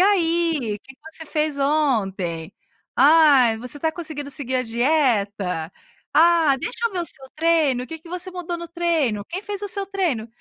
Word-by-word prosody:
aí, 330 - +2
que 265 - -14
que 255 - -47
você 320 - -7
fez 300 -1 -1
ontem?"; 200 - 0 0.5
"Ai, 275 -5 +6
você 250 +5 -4
tá 320 +2 0
conseguindo 305 -4 -5
seguir 260 -2 -1
a 255 - +1
dieta?"; 225 - 0 0.4
"Ah, 325 -4 +5
deixa 465 - -2
eu 460 - -6
ver 365 - -2
o - - -2
seu 265 - -3
treino, 310 -6 +2
o - - -13
que 325 +2 -7
que 320 - -16
você 360 +2 -4
mudou 355 -1 -5
no 340 - -7
treino?"; 325 - 0
"Quem 370 +3 -5
fez 410 -2 -5
o 410 - -3
seu 395 +1 0
treino?". 355 - -1
300 Hz, 185 wpm, -22 LUFS, 250-340 Hz, 0.5 s, Ai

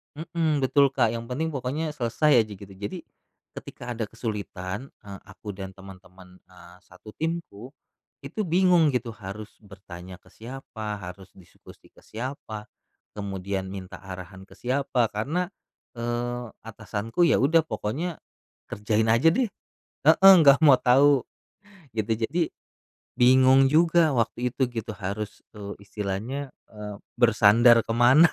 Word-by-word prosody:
Mhm, 155 -3 -1
betul 140 +2 +4
Kak, 115 -4 +2
yang 115 0 -5
penting 160 +6 -2
pokoknya 145 +4 -3
selesai 130 0 +2
aja 105 - -10
gitu, 100 0 -13
jadi 100 +2 -7 0.5
ketika 120 0 -8
ada 115 -2 -3
kesulitan, 105 0 -5 0.2
eee, 100 -1 -9
aku 105 +1 -12
dan 95 0 -8
teman-teman, 95 -1 -15
eee, 90 -1 -16
satu 110 - -15
timku, 155 -7 -5 0.5
itu 145 +10 -4
bingung 175 -2 +4
gitu 120 -2 -2
harus 105 0 -9
bertanya 95 -2 -11
ke - - -23
siapa, 110 -3 -7
harus 90 0 -10
diskusi 90 - -18
ke - - -20
siapa 110 -3 -7 0.5
kemudian 95 -1 -4
minta 95 -2 -8
arahan 95 0 -9
ke - - -18
siapa 125 -1 0
karena, 160 - -2 0.5
eee, 120 0 -3 0.2
atasanku 115 +7 -2
ya 165 - +4
udah 160 +4 +4
pokoknya 150 +9 -4 0.5
kerjain 105 +1 0
aja 120 +9 +5
deh. 245 -1 0 0.6
Heeh 195 0 +8
nggak 140 -2 +7
mau 130 -3 +7
tahu, 135 +1 +4 0.7
gitu, 110 +1 -1 0.2
jadi 170 +4 -1 0.8
bingung 130 +2 +6
juga 165 0 +4
waktu 120 +2 0
itu 130 - 0
gitu 115 -1 -5
harus, 100 +2 -5
eee, 100 -2 -7
istilahnya, 110 +8 -4 0.2
eee, 105 -1 -7 0.2
bersandar 115 0 +5
ke 115 - -2
mana 130 +8 +6
115 Hz, 135 wpm, -25 LUFS, 100-140 Hz, 0.8 s, Heeh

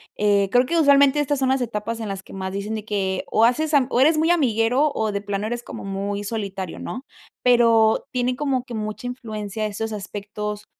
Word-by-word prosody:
eh, 205 -1 +2
creo 250 +1 +4
que, 340 - 0
usualmente, 280 -1 +5
estas 290 -1 0
son 265 -1 +1
las 265 0 +1
etapas 230 -1 -3
en 220 - -4
las 195 -1 -4
que - - -15
más 190 -1 -5
dicen 200 +3 -3
de 215 -1 -6
que 190 -3 -1
o 220 - +5
haces 305 +6 +1
am 275 -4 +4
o 245 - +1
eres 310 +4 +5
muy 320 +1 +2
amiguero, 260 -2 +2
o 220 -1 -1
de 200 0 -3
plano, 205 0 -3
eres 240 +1 -4
como - - -8
muy 200 +1 -3
solitario, 195 -4 -4
¿no? 255 - -6 0.4
Pero 230 -3 +4
tienen 250 0 0
como 270 -2 -1
que 245 -2 -8
mucha 215 +3 -4
influencia 215 -4 -5
esos 220 +1 -3
aspectos, 210 +1 -5
225 Hz, 210 wpm, -22 LUFS, 205-255 Hz, 0.4 s, usualmente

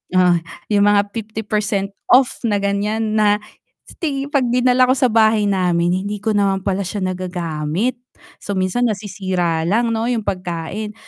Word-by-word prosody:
ah, 180 -2 +4 0.3
yung 205 -1 +4
mga 205 0 +3
50% 215 -2 -2 0.2
off 255 0 +4
na, 210 - +1
gan'yan, 210 +2 -1
na 205 -1 +4 0.6
sti 285 -3 -3
'pag 270 -4 +2
dinala 250 +1 +3
ko 255 - +3
sa 255 -2 +2
bahay 220 -1 +4
namin, 180 -4 +1 0.2
hindi 210 0 -5
ko 220 - +1
naman 195 -2 +1
pala 195 -1 -1
siya 195 0 -4
nagagamit. 180 +4 -2 0.4
So, 200 - -5
minsan 190 +6 0
nasisira 185 -5 -2
lang 230 +4 +1
'no, 225 +1 -1
yung 235 -3 -1
pagkain. 185 +3 -4
205 Hz, 150 wpm, -19 LUFS, 185-225 Hz, 0.6 s, ah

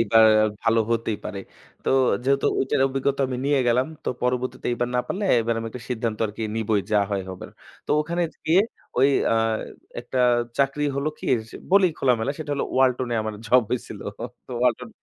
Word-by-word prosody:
এইবার 115 -1 +5 0.4
ভালো 115 0 +3
হতেই 115 -2 0
পারে। 100 - -5 0.5
তো - - +1 0.3
যেহেতু 140 +1 +2
ওইটার 135 +1 0
টা 135 - +5
অভিজ্ঞতা 135 +1 -1
আমি 130 - -3
নিয়ে 145 -1 +3
গেলাম। 125 +2 +3 0.2
তো - - -1
পরবর্তীতে 125 0 -1
এবার 120 0 -1
না - - +3
পারলে 205 +2 -3 0.2
এবার 115 +1 0
আমি 115 - -4
একটা 125 0 -8
সিদ্ধান্ত 110 -2 -2
আরকি 105 +2 -7
নিবোই 110 -2 +1
যা 105 - +5
হয় 100 -1 -1
হবার। 95 - -8 0.4
তো - - -6
ওখানে 170 +3 -1 0.2
গিয়ে 170 +4 +5 0.4
ওই 135 - +6 0.2
আ - - +3 0.7
একটা 120 +2 -4 0.4
চাকরি 140 +2 +1
হলো 140 +2 0
কি, - - -10 0.2
যে - - -14 0.2
বলিই 190 -4 +5
খোলামেলা 125 +1 +1
সেটা 155 -2 -5
হলো 140 - -1
ওয়ালটনে 130 -2 +2
আমার 110 -1 -4
জব 125 +2 +5
হয়েছিল। 125 - -4 0.5
তো - - -15
ওয়ালটন 125 -1 +1
125 Hz, 185 wpm, -24 LUFS, 115-140 Hz, 0.7 s, ওই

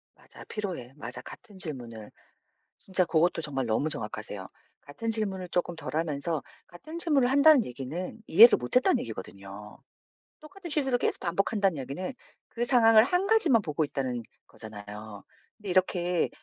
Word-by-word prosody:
맞아 - - -15
필요해. 180 - -6
맞아 125 -3 -7
같은 210 - -13
질문을 120 - -5 0.7
진짜 185 -2 +1
고것도 165 +1 +1
정말 135 -4 -3
너무 115 +7 0
정확하세요. 105 -6 -4 0.3
같은 225 +11 -6
질문을 190 -5 -1
쪼끔 175 -1 -1
덜 150 -1 -7
하면서 155 -2 -2 0.2
‘같은 310 - -9
질문을 285 -7 +2
한다.‘는 285 -2 +6
얘기는 145 - -6
‘이해를 230 +7 +8
못 125 0 -6
했다.‘는 250 - +4
얘기거든요. 100 -1 -9 0.6
‘똑같은 345 +3 -11
실수를 270 -4 +2
계속 - - -1
반복한다.‘는 195 0 0
얘기는 140 - -5 0.4
‘그 240 +1 -3
상황을 225 -3 +6
1 360 +9 0
가지만 340 - +4
보고 155 -2 -2
있다.‘는 130 -5 -3 0.2
거잖아요. 105 -1 -10 0.3
근데 205 -3 -8
이렇게 180 -1 +1
175 Hz, 355 characters per minute, -28 LUFS, -, 0.7 s, 이해를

